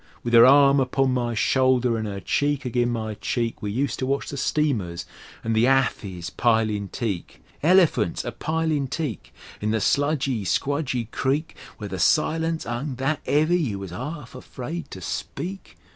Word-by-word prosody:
With 120 - -3
'er 115 +1 +9
arm 140 0 +6
upon 130 0 +1
my 120 -2 -1
shoulder 125 0 +2
an' 110 -1 -2
'er 100 -1 -4
cheek 145 +5 0
agin' 120 0 +1
my 110 -2 -3
cheek 115 +2 -2
We 105 - -3
useter 130 +3 -1
watch 135 +2 -1
the - - -5
steamers 120 - -1 0.4
an' 115 - -1
the 110 +2 +4
hathis 110 -9 0
pilin' 110 -4 +1
teak. 100 -8 -4 0.2
Elephints 160 - +3
a - - -3
pilin' 160 -3 -1
teak 140 - -4 0.3
In 105 - -1
the 110 +1 +1
sludgy, 140 -2 +1
squdgy 130 - -1
creek, 145 +5 -1 0.2
Where 105 - -6
the 95 -2 -5
silence 160 - +1
'ung 125 +4 -3
that 135 +4 -1
'eavy 155 +5 +3
you 120 - -1
was 95 -2 -7
'arf 130 - -6
afraid 135 +6 -7
to 95 - -9
speak! 185 - -6
130 Hz, 160 wpm, -24 LUFS, 110-145 Hz, 0.4 s, er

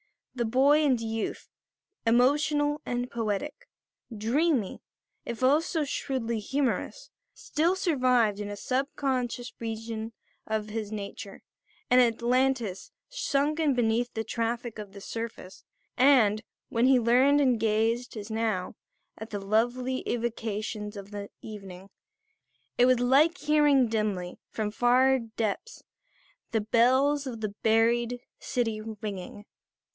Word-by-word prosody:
The 240 -2 -1
boy 275 +6 +4
and 265 -5 +3
youth, 225 -1 -4 0.6
emotional 290 +5 +3
and 245 0 -3
poetic, 230 +5 -3 0.5
dreamy 245 - 0 0.4
if 235 +2 -5
also 310 +4 +2
shrewdly 255 -5 -2
humorous, 270 - -2 0.2
still 335 +4 0
survived 250 - +2
in 205 -1 -4
a 205 - -5
sub 260 +6 -1
conscious 250 -3 -2
region 225 0 -5 0.3
of 215 -1 -2
his 215 -1 -4
nature, 200 -1 -7 0.5
an 250 - +7
Atlantis 240 -3 +1 0.2
sunken 290 +1 0
beneath 240 0 +1
the 220 - -1
traffic 230 0 -3
of 205 -2 -8
the 200 - -10
surface; 225 -4 -7 0.3
and, 245 -6 +5 0.3
when 235 +2 +2
he 265 -1 +6
leaned 250 +5 +4
and 255 -5 +3
gazed, 225 +2 0
as 210 +1 -7
now, 220 -5 -1 0.5
at 220 +1 -7
the 205 - -4
lovely 240 +6 0
evocations 215 -2 -3
of 200 +1 -9
the 205 -1 -6
evening, 195 -3 -9 0.9
it 245 - +6
was 255 -1 +4
like 285 +7 +4
hearing 295 -4 +4
dimly, 210 -5 -2
from 215 -1 -3
far 255 +4 +4
depths, 225 - -4 0.7
the 225 - +1
bells 260 +6 +3
of 230 -4 -6
the 215 - -1
buried 235 +2 +2 0.2
city 225 -3 -2 0.2
ringing. 205 -1 -6
235 Hz, 120 wpm, -28 LUFS, 215-260 Hz, 0.9 s, an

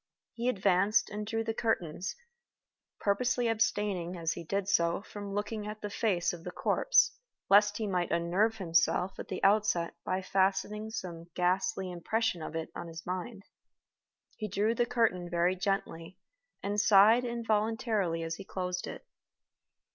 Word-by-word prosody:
He 240 +2 -1
advanced 200 -1 +2
and 210 0 -4
drew 225 +1 -1
the 225 0 -2
curtains, 185 -6 -1 0.8
purposely 240 +4 +1
abstaining, 205 -5 0
as 165 -1 -1
he 170 - -7
did 195 +4 -2
so, 170 -2 +2
from 205 -2 -8
looking 210 0 -3
at 210 0 -7
the 210 - -5
face 190 -6 +1
of 170 -1 -9
the - - -5
corpse, - - +2 0.3
lest 205 0 +6
he 220 - -2
might 180 -4 0
unnerve 185 +7 +1
himself 180 +1 +1
at - - -6
the 185 - -5
outset 195 -4 +3
by 185 +1 -2
fastening 195 +3 0
some 170 -6 -6
ghastly 185 +1 0
impression 180 +2 -1
of 155 - -6
it 165 0 -4
on - - -6
his 165 0 -9
mind. 190 +4 -5 0.9
He 215 - -3
drew 210 +3 +1
the 240 +1 +1
curtain 185 -8 +1
very 175 +2 +2
gently, 185 -3 -3 0.5
and 205 +1 +1
sighed 210 +3 +6
involuntarily 220 -6 0
as 165 0 -4
he 195 - -8
closed 180 -1 -4
it. - - -8
195 Hz, 155 wpm, -31 LUFS, 180-215 Hz, 0.9 s, lest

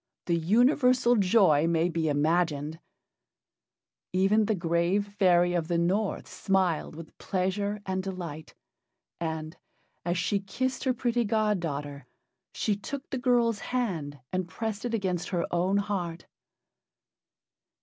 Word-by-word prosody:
The 170 - +1
universal 245 - +4
joy 185 -7 +4
may 165 0 +2
be 165 -2 -1
imagined. 155 0 0 1.3
Even 195 +4 +3
the 215 - +1
grave 170 +3 +1
fairy 175 -2 +4
of 170 -3 0
the 170 -1 0
North 190 +5 0
smiled 185 -5 0
with 165 0 -11
pleasure 200 +2 -2
and 190 0 -1
delight, 175 -5 -7 0.6
and, 160 -1 -4 0.5
as 175 +1 -1
she 200 +3 +1
kissed 260 +8 -3
her 260 - +3
pretty 240 0 0
god 215 -2 +1
daughter, 145 -4 -5 0.4
she 210 - 0
took 265 +7 -7
the 265 - -2
girl's 235 -3 +2
hand 180 - -2 0.2
and 185 -1 -1
pressed 220 +3 -4
it 235 -1 -1
against 185 -5 -2
her 175 -3 0
own 180 +3 +1
heart. 180 -5 -3
185 Hz, 130 wpm, -28 LUFS, 170-215 Hz, 1.3 s, universal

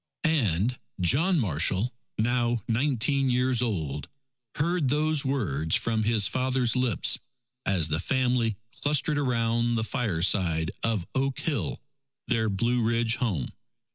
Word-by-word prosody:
And 120 - +1 0.2
John 155 - +3
Marshall, 95 - +1 0.2
now 120 0 0
nineteen 135 +2 +1
years 125 -1 +2
old, 80 - -3 0.5
heard 165 -2 +1
those 150 +1 +1
words 80 - 0
from 110 -2 0
his 110 -3 +4
father's 130 -1 0
lips, 125 -6 +2 0.5
as 90 -5 +3
the 75 +1 0
family 125 -1 0
clustered 145 +2 0
around 120 -3 +1
the 110 - 0
fireside 90 - 0
of 110 -6 0
Oak 135 0 -1
Hill, 155 -4 -2 0.4
their 110 -3 +1
Blue 120 +5 0
Ridge 115 0 +1
home. 100 - -1
120 Hz, 120 wpm, -27 LUFS, 100-130 Hz, 0.5 s, his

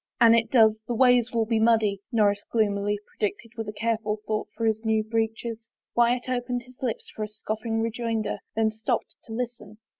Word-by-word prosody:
" - - -60
An 230 -2 +7
it 230 -1 +3
does, 220 -3 +5
the 240 - -1
ways 245 -1 +4
will 230 -1 +1
be 225 0 +1
muddy," 220 -3 +3
Norris 205 -3 +2
gloom 215 -3 +2
ily 205 +1 0
predicted 215 +2 -3
with 225 -2 -4
a - - -2
careful 220 0 -1
thought 215 +1 -1
for 230 - -1
his 220 0 +1
new 220 -1 +2
breeches. 225 +1 -2 0.3
Wyatt 240 +1 +3
opened 245 -1 -2
his 255 +1 -19
lips 245 -4 -3
for - - -6
a 215 - -1
scoffing 220 +1 -3
rejoinder, 230 -1 -2 0.2
then 220 0 +2
stopped 220 +1 -2
to - - -12
listen. 230 -3 -5
225 Hz, 200 wpm, -26 LUFS, 215-235 Hz, 0.3 s, An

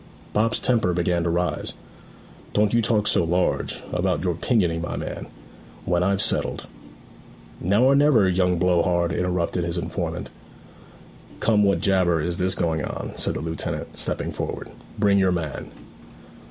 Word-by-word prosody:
Bob's 115 +3 +1
temper 115 -8 +1
began 85 0 +1
to 85 - 0
rise. 90 +1 -1 0.8
'Don't 105 +1 +2
you 120 - +4
talk 110 -2 +1
so 90 - +2
large, 90 +2 0
about - - 0
your 90 -2 +1
pinioning, 85 -3 +1
my 85 - -4
man. - - -5 0.6
When 85 0 +1
I've 95 +2 +2
settled - - -1 0.5
' - - -22
'Now 100 +7 +3
or 135 +1 +6
never, 140 -8 +5
young 90 -1 +2
blow 90 0 +3
hard,' 85 -1 +1
interrupted 90 -1 -1
his 85 +1 -3
informant. 85 - -4 1.1
'Come, 110 -2 +3
what 100 -1 +2
jabber 90 -4 +3
is 85 +3 -2
this 95 0 0
going 80 -3 0
on?' - - -5
said - - -2
the - - -3
lieutenant, 80 -1 -4
stepping - - -3
forward. - - -5 0.3
'Bring 100 -1 +3
your 95 -1 +3
man.' 80 -5 -3
90 Hz, 155 wpm, -24 LUFS, 85-100 Hz, 1.1 s, or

